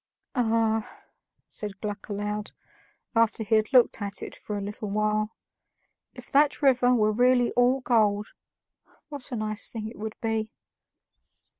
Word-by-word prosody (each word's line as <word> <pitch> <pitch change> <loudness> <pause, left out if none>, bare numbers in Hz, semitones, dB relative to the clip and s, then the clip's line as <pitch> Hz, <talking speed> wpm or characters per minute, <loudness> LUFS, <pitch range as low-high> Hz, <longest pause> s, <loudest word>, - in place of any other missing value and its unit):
"Ah!" 225 -3 0 0.4
said 205 -2 -7
Gluck 205 -1 -5
aloud, 210 +1 -3 0.6
after 230 0 +2
he 220 +1 -2
had 215 +1 +3
looked 250 -4 +4
at 200 0 -4
it - - -7
for 210 - -5
a - - -3
little 205 +1 -5
while, 215 +1 0 0.8
"if - - -12
that 290 +1 +3
river 250 -2 +4
were 215 -2 +3
really 245 +2 +3
all 250 +2 +3
gold, 210 -4 +2 0.8
what 285 -2 -8
a - - -2
nice 215 -1 -1
thing 220 -2 -5
it 225 - -10
would 215 0 -5
be." 225 -1 -1
220 Hz, 145 wpm, -27 LUFS, 210-245 Hz, 0.8 s, looked